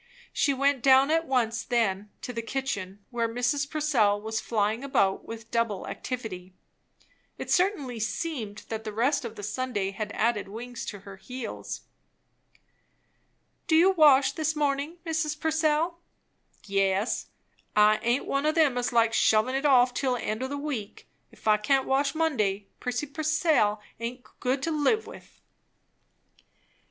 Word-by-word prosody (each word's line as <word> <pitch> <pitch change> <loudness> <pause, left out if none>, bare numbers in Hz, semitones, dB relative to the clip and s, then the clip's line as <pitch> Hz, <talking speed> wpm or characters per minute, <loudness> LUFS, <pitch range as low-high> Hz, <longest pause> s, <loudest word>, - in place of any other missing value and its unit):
She 285 - +2
went 275 -1 +1
down 270 +3 +5
at 325 0 +1
once 235 -3 0
then 210 -5 0
to 250 - -5
the 230 - -3
kitchen, 205 -6 -4
where 235 -2 0
Mrs. 245 +5 0
Purcell 270 -10 +2
was 220 +1 -3
flying 220 +2 0
about 200 -8 +1
with 225 0 -9
double 230 -4 0
activity. 190 -8 -6 0.8
It - - -5
certainly 355 - +1
seemed 220 -1 -3
that 220 -1 -4
the 215 - -5
rest 265 +6 +1
of 225 -1 -6
the 205 - -8
Sunday 210 -2 -2
had 210 +2 -5
added 220 -3 0
wings 235 +4 -7
to 205 -3 -6
her 195 -1 -11
heels. 250 +2 -6 1.9
"Do 320 - +3
you 350 +4 +6
wash 285 -6 +6
this 310 +1 -1
morning, 290 +2 -1
Mrs. 310 -2 -1
Purcell?" 320 +2 +1 0.7
"Yes. 195 +2 0 0.5
I 210 0 +5
aint 240 +3 +1
one 275 +2 0
o' - - +4
them 305 -6 +3
as 245 - -1
likes 230 -1 +3
shovin' 220 +4 +3
it 270 +2 -1
off 250 -2 +5
till 255 -1 0
the 245 - -5
end 215 +3 -3
o' 260 - -1
the 285 +2 -4
week. 275 -8 -5 0.2
If - - -12
I 215 0 +6
can't 265 +5 +1
wash 275 +1 +1
Monday, 210 -12 0
Prissy 250 +3 -2
Purcell 305 -7 +1 0.2
aint 245 +2 -5
good 265 +2 -1
to 330 - 0
live 310 +9 +1
with." - - -13
250 Hz, 155 wpm, -27 LUFS, 215-285 Hz, 1.9 s, you